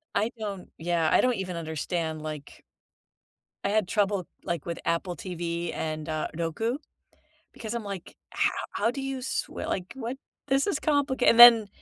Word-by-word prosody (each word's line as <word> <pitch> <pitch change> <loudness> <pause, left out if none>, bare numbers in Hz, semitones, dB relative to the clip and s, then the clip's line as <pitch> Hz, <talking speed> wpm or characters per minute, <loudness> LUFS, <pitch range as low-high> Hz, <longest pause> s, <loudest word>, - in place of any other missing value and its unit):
I 220 +3 +1
don't 200 -4 -5
yeah, 165 -1 +1
I - - +5
don't 255 -1 +2
even 185 -3 -4
understand, 160 0 -3
like 155 -2 -8 1.0
I - - +2
had 210 -2 +2
trouble, 200 -3 0 0.2
like, 170 -4 -3
with 170 - -3
Apple 170 +2 -1
TV 170 0 -4
and, 155 -1 -4
uh, 155 -1 -1
Roku 195 - -1 0.7
because 220 0 -6
I'm, 235 -1 -3
like, 200 -4 -7
how - - +1 0.2
"How 230 - +1
do 275 +2 -5
you 270 -1 -3
sw - - -2
like, 185 0 -4
what? 255 0 -4 0.3
This 270 +3 +2
is 350 -7 0
complica" 285 -4 +1
and 230 - +5
then, 235 -3 +11
190 Hz, 170 wpm, -27 LUFS, 170-235 Hz, 1.0 s, then